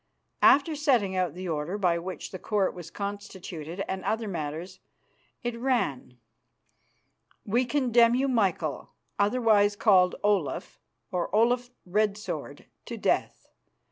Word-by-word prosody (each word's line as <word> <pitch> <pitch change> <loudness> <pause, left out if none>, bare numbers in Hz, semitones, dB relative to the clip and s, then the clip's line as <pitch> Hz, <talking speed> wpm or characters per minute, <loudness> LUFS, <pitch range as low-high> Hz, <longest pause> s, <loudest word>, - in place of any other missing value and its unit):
After 290 +3 +5
setting 250 -11 +2
out 180 -4 0
the 185 0 -6
order 160 +4 -2
by 175 -4 +2
which 185 +2 -6
the 185 - -7
Court 205 -1 0
was 175 -2 -9
constituted 190 -3 -6
and 190 0 -4
other 225 0 -1
matters, 170 +1 -5 0.6
it 240 -1 -2
ran: 230 - -1 1.3
"We 235 +5 +1
condemn 240 -3 +3
you, 270 +2 +1
Michael, 190 - -1 0.3
otherwise 210 -1 +3
called 190 -4 +4
Olaf 200 -7 0 0.3
or 180 -1 -1
Olaf 245 +2 +2 0.2
Red 205 +2 +1
Sword, 215 - -6 0.2
to - - -6
death. - - -1
200 Hz, 125 wpm, -27 LUFS, 180-235 Hz, 1.3 s, After